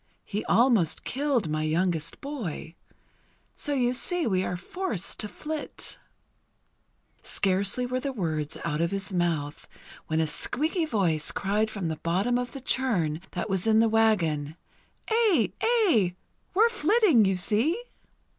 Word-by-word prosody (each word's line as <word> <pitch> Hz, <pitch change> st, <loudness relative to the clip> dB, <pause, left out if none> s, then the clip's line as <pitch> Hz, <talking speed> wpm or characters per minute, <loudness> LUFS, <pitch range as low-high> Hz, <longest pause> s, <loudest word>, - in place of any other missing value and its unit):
He 210 Hz, +1 st, -3 dB
almost 225 Hz, -, +3 dB
killed 270 Hz, -, 0 dB
my 155 Hz, 0 st, -1 dB
youngest 165 Hz, 0 st, -1 dB
boy. 215 Hz, -, -5 dB, 0.8 s
So 290 Hz, -, -2 dB
you 245 Hz, -2 st, +2 dB
see 345 Hz, +6 st, 0 dB
we 190 Hz, -4 st, +1 dB
are 180 Hz, -, -2 dB
forced 230 Hz, -, -4 dB
to 210 Hz, -, -2 dB
flit." 305 Hz, +7 st, -5 dB, 1.2 s
Scarcely 200 Hz, +5 st, 0 dB
were 255 Hz, +1 st, -1 dB
the 275 Hz, +1 st, -3 dB
words 155 Hz, -, -2 dB
out 160 Hz, -1 st, -1 dB
of 170 Hz, -, +1 dB
his 195 Hz, 0 st, -3 dB
mouth 165 Hz, -5 st, -1 dB, 0.4 s
when 160 Hz, 0 st, 0 dB
a 160 Hz, -, +3 dB
squeaky 310 Hz, -, 0 dB
voice 175 Hz, -, 0 dB
cried 210 Hz, +3 st, 0 dB
from 200 Hz, -5 st, -4 dB
the 160 Hz, -1 st, -3 dB
bottom 195 Hz, +11 st, 0 dB
of 245 Hz, -1 st, -4 dB
the 275 Hz, -, -7 dB
churn, 200 Hz, -13 st, 0 dB
that 180 Hz, +4 st, -3 dB
was 190 Hz, 0 st, -1 dB
in 220 Hz, 0 st, +5 dB
the 225 Hz, -, +5 dB
wagon: 170 Hz, -10 st, +2 dB, 0.5 s
"Aye! 420 Hz, -, +3 dB
Aye! 360 Hz, -, +3 dB, 0.4 s
We're 445 Hz, +4 st, +5 dB
flitting, 405 Hz, -, +4 dB
you 190 Hz, 0 st, +2 dB
see!" 220 Hz, -, +1 dB
210 Hz, 145 wpm, -27 LUFS, 170-265 Hz, 1.2 s, in